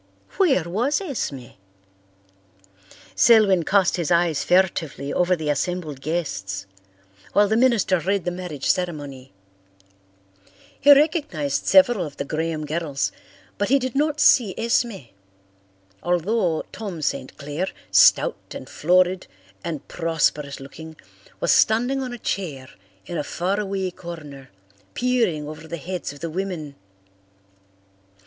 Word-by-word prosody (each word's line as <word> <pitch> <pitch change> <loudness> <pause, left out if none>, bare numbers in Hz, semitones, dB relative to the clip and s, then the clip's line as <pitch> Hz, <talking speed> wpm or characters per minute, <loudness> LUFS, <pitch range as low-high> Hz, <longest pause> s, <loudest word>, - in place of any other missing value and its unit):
Where 310 - +3
was 230 - 0
Esme? 170 - -4 1.6
Selwyn 210 -6 +5
cast 190 +2 +2
his 170 -2 -2
eyes 170 -3 +2
furtively 165 -6 +1
over 180 +1 +2
the 155 -3 -1
assembled 155 -2 -3
guests 100 - -3 0.7
while 205 0 +5
the 220 - +1
minister 230 -6 +3
read 195 +2 -1
the 175 - 0
marriage 175 -6 -6
ceremony. 145 -7 -2 1.5
He 290 - +6
recognized 295 0 +2
several 245 -9 +5
of 150 -4 -8
the 140 - -3
Graham 155 +1 -2
girls 150 -2 -2 0.5
but 205 - 0
he 275 - +5
did 260 -2 -3
not 300 +1 0
see 235 -9 +5
Esme, 230 - -1 0.9
although 175 -1 0
Tom 185 -6 -6
St. 130 - -3
Clair, 145 +6 -3 0.2
stout - - +4
and - - -8
florid 180 +2 +2 0.4
and 165 -4 -5
prosperous 150 -4 -1
looking, 150 +4 -10 0.4
was - - +2
standing 245 +5 +3
on 255 -1 -4
a 240 - -6
chair 155 - -4 0.3
in 170 - -4
a - - -1
faraway 190 +3 -2
corner, 150 -7 -10 0.5
peering 235 -12 0
over 155 +1 -9
the 170 - -5
heads 175 +1 -5
of 145 - -13
the 165 - -3
women. 175 -5 -4
175 Hz, 125 wpm, -23 LUFS, 155-220 Hz, 1.6 s, He